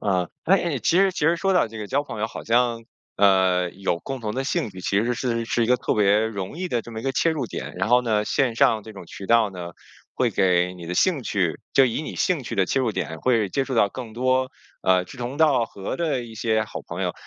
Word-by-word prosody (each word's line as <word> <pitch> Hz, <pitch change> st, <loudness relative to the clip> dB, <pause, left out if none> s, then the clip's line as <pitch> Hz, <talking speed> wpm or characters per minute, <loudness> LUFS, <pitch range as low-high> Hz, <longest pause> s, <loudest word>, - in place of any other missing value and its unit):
啊， 90 Hz, -4 st, 0 dB, 0.2 s
哎， 170 Hz, -6 st, +2 dB
其 165 Hz, -, +1 dB
实 195 Hz, 0 st, +4 dB
其 -, -, -7 dB
实 165 Hz, +3 st, +3 dB
说 195 Hz, +3 st, +1 dB
到 180 Hz, -, +3 dB
这 110 Hz, 0 st, -9 dB
个 105 Hz, -, -5 dB
交 140 Hz, +7 st, 0 dB
朋 145 Hz, -, -7 dB
友， 110 Hz, -, +1 dB
好 -, -, -9 dB
像， 115 Hz, 0 st, +1 dB, 0.3 s
呃， 95 Hz, -3 st, +3 dB
有 95 Hz, -2 st, -2 dB
共 135 Hz, +8 st, -6 dB
同 105 Hz, -1 st, -4 dB
的 135 Hz, -, -2 dB
兴 125 Hz, -5 st, -1 dB
趣， 95 Hz, -1 st, -10 dB
其 100 Hz, +3 st, +1 dB
实 120 Hz, +1 st, 0 dB
是 115 Hz, -1 st, -1 dB
是 115 Hz, +1 st, 0 dB
一 -, -, -1 dB
个 125 Hz, +2 st, +4 dB
特 -, -, -1 dB
别 105 Hz, 0 st, +4 dB
容 105 Hz, -, -4 dB
易 185 Hz, 0 st, -3 dB
的 120 Hz, -6 st, -1 dB
这 120 Hz, -, -11 dB
么 110 Hz, -, -5 dB
一 -, -, -10 dB
个 135 Hz, +1 st, -1 dB
切 165 Hz, -, +2 dB
入 150 Hz, -6 st, -2 dB
点。 -, -, -6 dB
然 95 Hz, +3 st, -1 dB
后 125 Hz, +1 st, +5 dB
呢， 110 Hz, -3 st, +1 dB
线 125 Hz, +1 st, +1 dB
上 110 Hz, -2 st, +3 dB
这 110 Hz, -, -11 dB
种 95 Hz, -4 st, -11 dB
渠 95 Hz, -, -9 dB
道 115 Hz, -2 st, +4 dB
呢， 90 Hz, -2 st, -7 dB, 0.4 s
会 -, -, +1 dB
给 90 Hz, -1 st, +2 dB
你 85 Hz, -2 st, -10 dB
的 90 Hz, -, -3 dB
兴 160 Hz, -, +2 dB
趣 90 Hz, -8 st, -1 dB
就 135 Hz, -, +6 dB
以 120 Hz, +5 st, -2 dB
你 -, -, -7 dB
兴 175 Hz, -6 st, +1 dB
趣 -, -, -5 dB
的 95 Hz, -2 st, +2 dB
切 135 Hz, -, +1 dB
入 120 Hz, -4 st, 0 dB
点 80 Hz, -4 st, -4 dB
会 115 Hz, -5 st, +2 dB
接 135 Hz, +8 st, -1 dB
触 135 Hz, -, -4 dB
到 105 Hz, -3 st, +4 dB
更 115 Hz, +1 st, -8 dB
多， 130 Hz, +2 st, +1 dB, 0.3 s
呃， 95 Hz, -1 st, +3 dB
志 115 Hz, -, -12 dB
同 125 Hz, +3 st, -4 dB
道 150 Hz, -6 st, +4 dB
合 100 Hz, -3 st, -6 dB
的 155 Hz, -8 st, -1 dB
一 115 Hz, -1 st, -11 dB
些 110 Hz, 0 st, +1 dB
好 -, -, -7 dB
朋 85 Hz, +3 st, -5 dB
友， 90 Hz, -2 st, -1 dB
115 Hz, 285 characters per minute, -24 LUFS, 95-130 Hz, 0.4 s, 就